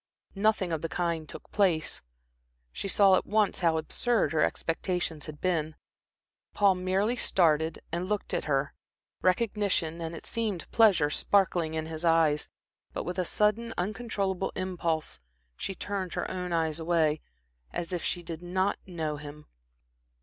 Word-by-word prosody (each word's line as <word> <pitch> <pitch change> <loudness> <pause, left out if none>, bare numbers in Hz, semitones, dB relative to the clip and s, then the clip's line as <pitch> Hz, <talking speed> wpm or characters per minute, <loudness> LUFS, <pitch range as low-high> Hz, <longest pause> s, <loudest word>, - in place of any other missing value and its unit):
Nothing 200 -3 +2
of 155 - -1
the 165 - -3
kind 170 -3 -1
took - - -10
place. 180 -6 +1 0.7
She - - -4
saw 195 -1 +5
at - - -2
once 210 -1 +2
how 165 -3 +3
absurd 230 +8 +1
her 155 - +2
expectations 165 -2 -1
had 150 -1 -8
been. 160 -4 0 0.8
Paul 200 -2 +5
merely 190 +5 +1
started 160 -7 +2
and 175 +3 -2
looked 210 -1 -2
at - - 0
her, 140 -1 0 0.5
recognition 185 -4 +1
and 165 0 -4
it - - -9
seemed, 215 -6 -2
pleasure 200 -10 +5
sparkling 175 -3 +2
in 160 0 -2
his 160 0 -6
eyes; 165 -3 +3 0.4
but - - -3
with 180 +1 -4
a 180 - +1
sudden, 215 +5 +1
uncontrollable 195 -1 -1
impulse, 170 - -2 0.4
she 195 - -4
turned 190 -2 -3
her - - -1
own 180 -1 -3
eyes 160 -2 0
away, 160 -2 +2 0.5
as 175 +2 -4
if 175 - -2
she 175 - -1
did 165 -1 -6
not 185 +3 0
know 160 -4 -3
him. 150 +1 -10
175 Hz, 150 wpm, -29 LUFS, 160-195 Hz, 0.8 s, saw